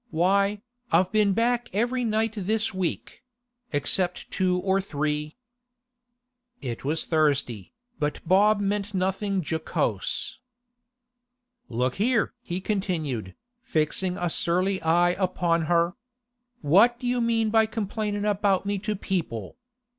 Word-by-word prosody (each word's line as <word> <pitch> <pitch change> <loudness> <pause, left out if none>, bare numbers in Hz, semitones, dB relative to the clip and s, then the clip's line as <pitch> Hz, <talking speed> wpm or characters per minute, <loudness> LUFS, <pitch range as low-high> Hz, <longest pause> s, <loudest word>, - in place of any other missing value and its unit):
Why, 200 +4 +2 0.3
I've 180 +3 +3
been 210 -2 +3
back 240 +3 +1
every 240 +5 0
night 220 -1 0
this 215 +2 -1
week—except 235 - -3
two 185 -1 +1
or 190 +1 +1
three.' 150 -1 -3 1.2
It 120 -3 -5
was 155 +4 -1
Thursday, 140 - 0 0.3
but 150 0 -1
Bob 205 +4 +5
meant 205 0 -1
nothing 190 +1 0
jocose. 160 +9 -2 1.3
'Look 125 +2 -1
here!' 225 +2 +1
he 180 -6 -4
continued, 160 - -2 0.3
fixing 180 - 0
a 175 -1 -1
surly 185 +4 0
eye 175 +2 +3
upon 175 -3 +1
her. 170 +1 +2 0.7
'What 210 +11 +5
do 250 - -7
you 245 0 +1
mean 225 -2 +1
by 220 -1 +4
complaining 210 -1 -2
about 200 -2 +1
me 200 0 -1
to 210 +1 -2
people? 170 - -3
190 Hz, 115 wpm, -26 LUFS, 165-215 Hz, 1.3 s, Bob